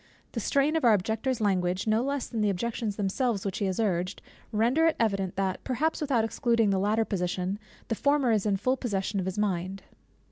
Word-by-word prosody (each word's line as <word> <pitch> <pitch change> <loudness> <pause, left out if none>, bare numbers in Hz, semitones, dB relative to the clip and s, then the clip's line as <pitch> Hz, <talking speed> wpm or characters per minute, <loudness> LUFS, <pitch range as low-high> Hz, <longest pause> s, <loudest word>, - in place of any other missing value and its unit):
The - - -3
strain 285 +2 +2
of 320 - +1
our 230 -3 +6
Objector's 220 +5 -1
language, 185 -2 +1
no 220 +1 +2
less 280 0 -1
than 225 - -3
the 210 - +3
objections 215 +2 -2
themselves 205 +1 -1
which 195 - -2
he 205 - 0
has 190 +1 -1
urged, 185 -3 0 0.3
render 240 +9 +3
it 325 - +2
evident 195 -5 0
that 190 -1 -1
(perhaps 310 +6 -1
without 260 -7 +2
excluding 230 -2 +1
the 190 - +2
latter 215 +3 +2
position) 185 0 -2 0.3
the - - -1
former 280 +1 +2
is 215 -2 +1
in 200 -2 +2
full 255 +7 +1
possession 200 -4 -2
of 185 - -2
his 190 - -3
mind. 190 -2 -1
215 Hz, 205 wpm, -28 LUFS, 195-240 Hz, 0.3 s, our